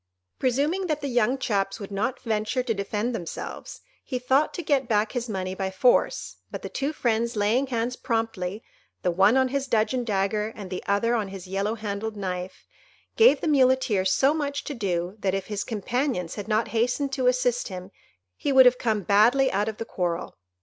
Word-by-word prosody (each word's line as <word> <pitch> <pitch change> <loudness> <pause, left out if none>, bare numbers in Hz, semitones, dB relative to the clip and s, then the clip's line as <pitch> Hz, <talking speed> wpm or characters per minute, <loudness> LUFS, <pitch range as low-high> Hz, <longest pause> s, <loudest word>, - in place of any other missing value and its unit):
Presuming 290 +9 +1
that 305 -2 -1
the 285 - -2
young 245 0 +2
chaps 200 -5 -1
would 200 -1 -8
not 225 +7 -1
venture 220 +2 -1
to 240 -2 0
defend 210 +4 -2
themselves, 175 -7 -6 0.2
he 255 - -3
thought 265 +4 +2
to 350 - -4
get 280 -4 +1
back 210 -2 +1
his 245 -2 -3
money 185 -2 -3
by 190 0 -2
force; 190 +6 +2
but - - -7
the - - -5
two 275 +2 -2
friends 235 -4 0
laying 220 +6 +2
hands 240 0 -1
promptly, 225 -5 -2 0.4
the 180 - +2
one 195 +8 +4
on 260 -1 +3
his 275 +1 -2
dudgeon 240 +2 +1
dagger 210 0 0
and 195 -3 -8
the 185 - -4
other 205 +4 +2
on 220 -4 0
his 195 -1 -8
yellow 195 +4 -1
handled 215 0 -4
knife, 185 -1 -5 0.5
gave 465 +2 +6
the - - -1
Muleteer 260 -8 +3
so 265 +9 +3
much 285 -2 -2
to 290 - -5
do, 185 -4 -2
that 195 -1 0
if 195 -1 -3
his 210 -2 -3
companions 235 - -2
had 205 -1 -6
not 220 +1 +1
hastened 250 +4 0
to 260 -2 +1
assist 250 -1 +1
him, 185 0 -8 0.4
he 285 - -2
would 265 -1 +8
have 250 0 +5
come 215 -4 0
badly 235 +8 +4
out 205 +3 0
of 215 - -7
the 225 - -4
quarrel. 175 -4 -3
225 Hz, 195 wpm, -25 LUFS, 200-255 Hz, 0.5 s, would